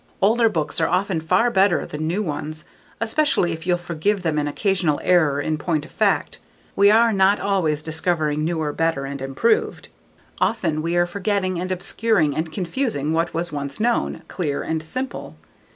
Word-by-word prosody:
Older 225 Hz, +3 st, +4 dB
books 165 Hz, -4 st, -2 dB
are 160 Hz, -, +3 dB
often 185 Hz, -2 st, 0 dB
far 230 Hz, +9 st, +2 dB
better 195 Hz, -1 st, +3 dB
than 155 Hz, +1 st, -4 dB
new 190 Hz, +6 st, 0 dB
ones, 155 Hz, -2 st, -5 dB, 0.3 s
especially 230 Hz, -, +1 dB
if 165 Hz, +1 st, -6 dB
you'll 175 Hz, -1 st, +3 dB
forgive 175 Hz, +3 st, -1 dB
them 155 Hz, -3 st, 0 dB
an 145 Hz, -, -1 dB
occasional 175 Hz, -2 st, 0 dB
error 155 Hz, -6 st, +3 dB
in 155 Hz, +1 st, -1 dB
point 155 Hz, -1 st, -1 dB
of -, -, -15 dB
fact. -, -, 0 dB, 0.4 s
We 200 Hz, +1 st, +5 dB
are 225 Hz, +1 st, +5 dB
not 195 Hz, +1 st, +3 dB
always 165 Hz, -7 st, 0 dB
discovering 155 Hz, -2 st, 0 dB
newer, 160 Hz, -2 st, -1 dB
better, 165 Hz, -4 st, 0 dB
and 140 Hz, 0 st, -6 dB
improved. 135 Hz, +13 st, 0 dB, 0.5 s
Often 170 Hz, -9 st, 0 dB
we 170 Hz, +2 st, -1 dB
are 175 Hz, 0 st, +3 dB
forgetting 185 Hz, 0 st, -1 dB
and 185 Hz, +1 st, -3 dB
obscuring 185 Hz, -4 st, +1 dB
and 160 Hz, 0 st, -2 dB
confusing 180 Hz, -, -2 dB
what 165 Hz, 0 st, 0 dB
was 170 Hz, 0 st, -2 dB
once 140 Hz, -2 st, -4 dB
known, 235 Hz, +2 st, 0 dB
clear 155 Hz, -6 st, -3 dB
and 160 Hz, -1 st, -2 dB
simple. 255 Hz, +12 st, -6 dB
170 Hz, 170 wpm, -22 LUFS, 155-200 Hz, 0.5 s, We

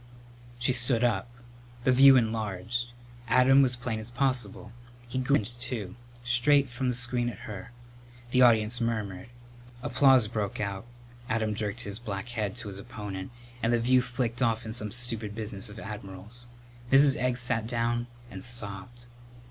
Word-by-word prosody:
She 125 Hz, +2 st, +1 dB
stood 120 Hz, -1 st, +4 dB
up. 120 Hz, -2 st, +1 dB, 0.5 s
The 130 Hz, -, +4 dB
view 135 Hz, +1 st, +8 dB
enlarged. 110 Hz, 0 st, -1 dB, 0.4 s
Adam 130 Hz, +3 st, +5 dB
was 125 Hz, -2 st, +3 dB
plain 120 Hz, -2 st, -4 dB
as 110 Hz, +2 st, -8 dB
possible. 125 Hz, -4 st, -1 dB, 0.4 s
He 130 Hz, +2 st, -3 dB
grinned, 120 Hz, -3 st, 0 dB
too; 115 Hz, -6 st, -4 dB, 0.3 s
straight 130 Hz, +3 st, +4 dB
from 125 Hz, +1 st, -3 dB
the 125 Hz, -, 0 dB
screen 120 Hz, 0 st, +1 dB
at 110 Hz, -, -9 dB
her. 105 Hz, +2 st, -8 dB, 0.6 s
The 125 Hz, -, +3 dB
audience 115 Hz, -1 st, +4 dB
murmured. 105 Hz, -5 st, -3 dB, 0.6 s
Applause 135 Hz, -4 st, +4 dB
broke 105 Hz, -2 st, -3 dB
out, 100 Hz, +1 st, -4 dB, 0.4 s
Adam 110 Hz, -1 st, 0 dB
jerked 105 Hz, +1 st, -3 dB
his 100 Hz, -2 st, -5 dB
black 105 Hz, -1 st, -5 dB
head 110 Hz, -4 st, -3 dB
to 120 Hz, -3 st, -5 dB
his 100 Hz, -1 st, -6 dB
opponent 100 Hz, -1 st, -7 dB, 0.3 s
and 115 Hz, -, +1 dB
the 120 Hz, -, +3 dB
view 125 Hz, +2 st, +4 dB
flicked 120 Hz, -1 st, -3 dB
off 115 Hz, -2 st, +1 dB
in 110 Hz, -, -5 dB
some 105 Hz, -2 st, 0 dB
stupid 115 Hz, -4 st, -2 dB
business 105 Hz, -3 st, -2 dB
of 105 Hz, -, -11 dB
admirals. 105 Hz, +3 st, -7 dB, 0.4 s
Mrs. 135 Hz, 0 st, +6 dB
Egg 125 Hz, -2 st, 0 dB
sat 120 Hz, -3 st, +1 dB
down 120 Hz, 0 st, -1 dB, 0.2 s
and 95 Hz, -2 st, -5 dB
sobbed. 120 Hz, 0 st, -4 dB
120 Hz, 155 wpm, -28 LUFS, 105-125 Hz, 0.6 s, view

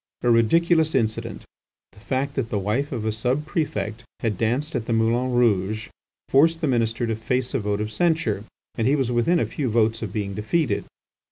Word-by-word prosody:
A 120 Hz, -, +4 dB
ridiculous 160 Hz, +7 st, +3 dB
incident, 110 Hz, -4 st, -1 dB, 0.5 s
the 100 Hz, -, -18 dB
fact 135 Hz, +5 st, -2 dB
that 130 Hz, -5 st, -2 dB
the 105 Hz, -, -1 dB
wife 105 Hz, +9 st, -1 dB
of 115 Hz, -5 st, -3 dB
a 110 Hz, -, +1 dB
subprefect 115 Hz, -, -2 dB, 0.2 s
had 110 Hz, -3 st, 0 dB
danced 125 Hz, -, -1 dB
at 115 Hz, -3 st, -2 dB
the 115 Hz, -, 0 dB
Moulin 115 Hz, +3 st, +1 dB
Rouge, 110 Hz, -3 st, +1 dB, 0.4 s
forced 160 Hz, +4 st, +4 dB
the -, -, +1 dB
minister 115 Hz, -2 st, +1 dB
to 115 Hz, -1 st, -1 dB
face 125 Hz, +3 st, -2 dB
a 135 Hz, -, +1 dB
vote 105 Hz, -1 st, -1 dB
of 105 Hz, 0 st, -3 dB
censure, 155 Hz, -, +1 dB, 0.3 s
and 115 Hz, -, 0 dB
he 140 Hz, -, +4 dB
was 130 Hz, -4 st, 0 dB
within 120 Hz, +9 st, +2 dB
a -, -, +1 dB
few 140 Hz, -5 st, -3 dB
votes 115 Hz, 0 st, +2 dB
of 110 Hz, -4 st, -4 dB
being 100 Hz, -1 st, -3 dB
defeated. 110 Hz, -, 0 dB
115 Hz, 190 wpm, -24 LUFS, 110-135 Hz, 0.5 s, A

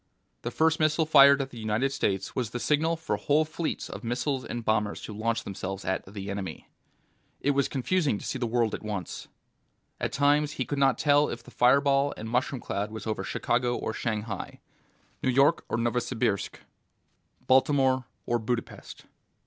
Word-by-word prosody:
The -, -, -3 dB
first 160 Hz, 0 st, +2 dB
missile 155 Hz, +1 st, +2 dB
fired 140 Hz, -2 st, +7 dB
at 135 Hz, -, -10 dB
the 120 Hz, -, -9 dB
United 110 Hz, +5 st, 0 dB
States 95 Hz, -6 st, -1 dB
was 120 Hz, -4 st, -1 dB
the 120 Hz, -, -4 dB
signal 155 Hz, +5 st, +1 dB
for 160 Hz, -10 st, -2 dB
whole 145 Hz, +8 st, +2 dB
fleets 160 Hz, +1 st, -3 dB
of -, -, -8 dB
missiles 125 Hz, +3 st, -1 dB
and 120 Hz, -2 st, -5 dB
bombers 105 Hz, -1 st, +1 dB
to 110 Hz, -, -7 dB
launch 115 Hz, +2 st, -1 dB
themselves 95 Hz, 0 st, -5 dB
at 95 Hz, +1 st, -1 dB
the 100 Hz, -1 st, -5 dB
Enemy. 95 Hz, -5 st, -6 dB, 0.7 s
It 145 Hz, -, +1 dB
was 140 Hz, -1 st, +1 dB
confusing 140 Hz, -, 0 dB
to -, -, -9 dB
see 130 Hz, -, -3 dB
the 120 Hz, -, -1 dB
world 115 Hz, -1 st, +1 dB
at -, -, -4 dB
once; 105 Hz, -5 st, -5 dB, 0.7 s
at -, -, -2 dB
times 145 Hz, +1 st, +2 dB
he 130 Hz, -, -2 dB
could 145 Hz, +4 st, -3 dB
not 135 Hz, -3 st, +4 dB
tell 145 Hz, 0 st, +3 dB
if 115 Hz, -, -6 dB
the -, -, -14 dB
fireball 140 Hz, +2 st, +3 dB
and 110 Hz, -, -6 dB
mushroom 125 Hz, +2 st, -1 dB
cloud 105 Hz, +2 st, -3 dB
was 110 Hz, 0 st, -7 dB
over 110 Hz, -1 st, -2 dB
Chicago 120 Hz, 0 st, 0 dB
or 110 Hz, -, -3 dB
Shanghai, 110 Hz, -3 st, -4 dB, 0.6 s
New -, -, +1 dB
York 140 Hz, +6 st, +3 dB
or -, -, 0 dB
Novosibirsk, 120 Hz, -3 st, -1 dB, 0.9 s
Baltimore 130 Hz, -1 st, +3 dB, 0.2 s
or 120 Hz, 0 st, +1 dB
Budapest. 115 Hz, +1 st, -5 dB
125 Hz, 175 wpm, -28 LUFS, 110-140 Hz, 0.9 s, fired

